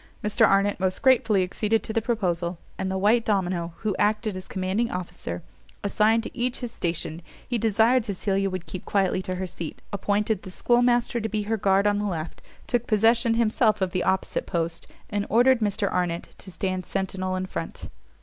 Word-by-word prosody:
Mr 210 Hz, 0 st, +4 dB
Arnott 200 Hz, 0 st, +2 dB
most 185 Hz, 0 st, -1 dB
gratefully 225 Hz, -7 st, +4 dB
acceded 210 Hz, +4 st, 0 dB
to 220 Hz, -, -4 dB
the 225 Hz, -, +1 dB
proposal; 180 Hz, -7 st, -1 dB, 0.2 s
and 190 Hz, -, -3 dB
the 190 Hz, -, -1 dB
white 215 Hz, +4 st, +3 dB
domino, 180 Hz, -5 st, 0 dB
who 210 Hz, -3 st, -1 dB
acted 215 Hz, 0 st, +1 dB
as 185 Hz, -, -6 dB
commanding 195 Hz, +5 st, -1 dB
officer, 175 Hz, -, -5 dB, 0.4 s
assigned 215 Hz, +3 st, +3 dB
to -, -, -8 dB
each 250 Hz, +1 st, -1 dB
his 245 Hz, -2 st, -4 dB
station: 165 Hz, -3 st, -3 dB, 0.3 s
he 240 Hz, -2 st, -1 dB
desired 225 Hz, +3 st, +3 dB
Cecilia 195 Hz, -1 st, -1 dB
would 185 Hz, -2 st, -5 dB
keep 185 Hz, -, -7 dB
quietly 190 Hz, -2 st, +1 dB
to 185 Hz, 0 st, -3 dB
her 185 Hz, +1 st, -3 dB
seat, 170 Hz, -3 st, -6 dB
appointed 205 Hz, +1 st, 0 dB
the 190 Hz, -, -9 dB
schoolmaster 240 Hz, +3 st, +2 dB
to 220 Hz, -, -2 dB
be 215 Hz, -1 st, -1 dB
her 220 Hz, +2 st, 0 dB
guard 195 Hz, -1 st, +2 dB
on 205 Hz, 0 st, +2 dB
the 210 Hz, -, -1 dB
left, 170 Hz, -5 st, -4 dB, 0.2 s
took 240 Hz, 0 st, -1 dB
possession 225 Hz, +2 st, +3 dB
himself 220 Hz, -1 st, +2 dB
of 190 Hz, -2 st, 0 dB
the 180 Hz, -, 0 dB
opposite 190 Hz, 0 st, 0 dB
post, 170 Hz, 0 st, -2 dB, 0.2 s
and 205 Hz, -1 st, -1 dB
ordered 245 Hz, +2 st, +5 dB
Mr 205 Hz, -1 st, 0 dB
Arnott 175 Hz, -2 st, -1 dB
to 195 Hz, -, -9 dB
stand 185 Hz, 0 st, -2 dB
centinel 185 Hz, -1 st, -2 dB
in 185 Hz, -, -2 dB
front. -, -, -6 dB
200 Hz, 190 wpm, -25 LUFS, 185-225 Hz, 0.4 s, ordered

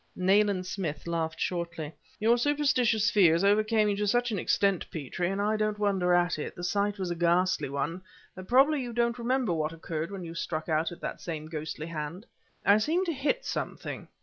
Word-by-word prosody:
Nayland 195 Hz, 0 st, +2 dB
Smith 170 Hz, -6 st, -4 dB
laughed 165 Hz, -1 st, -2 dB
shortly. 170 Hz, -3 st, -3 dB, 0.3 s
"Your 225 Hz, +3 st, +4 dB
superstitious 245 Hz, -6 st, +2 dB
fears 175 Hz, -4 st, +4 dB
overcame 215 Hz, +2 st, +3 dB
you 205 Hz, -, +1 dB
to 210 Hz, 0 st, 0 dB
such 245 Hz, +3 st, +2 dB
an 205 Hz, -, -1 dB
extent, 195 Hz, +1 st, +1 dB
Petrie 165 Hz, +4 st, -3 dB
and 195 Hz, +1 st, -2 dB
I 210 Hz, +2 st, +1 dB
don't 215 Hz, -1 st, 0 dB
wonder 195 Hz, -4 st, +1 dB
at 175 Hz, -2 st, +2 dB
it; -, -, -5 dB
the 175 Hz, -, -8 dB
sight 200 Hz, +3 st, 0 dB
was 185 Hz, -2 st, -3 dB
a -, -, -1 dB
ghastly 175 Hz, -1 st, +2 dB
one 145 Hz, +6 st, -3 dB, 0.3 s
that 185 Hz, 0 st, -9 dB
probably 275 Hz, +4 st, +4 dB
you 240 Hz, -2 st, -5 dB
don't 235 Hz, 0 st, 0 dB
remember 245 Hz, -4 st, +1 dB
what 155 Hz, 0 st, -1 dB
occurred 165 Hz, 0 st, -4 dB
when 195 Hz, -2 st, -6 dB
you 165 Hz, -1 st, -7 dB
struck 160 Hz, -1 st, -3 dB
out 160 Hz, +1 st, +1 dB
at 175 Hz, -, -10 dB
that -, -, -5 dB
same 155 Hz, -3 st, -5 dB
ghostly 155 Hz, -1 st, -5 dB
hand?" 165 Hz, +4 st, -5 dB, 0.4 s
"I 200 Hz, +2 st, +6 dB
seemed 330 Hz, -, +1 dB
to 335 Hz, -, -1 dB
hit 295 Hz, -, -1 dB
something." -, -, -4 dB
190 Hz, 200 wpm, -29 LUFS, 165-215 Hz, 0.4 s, I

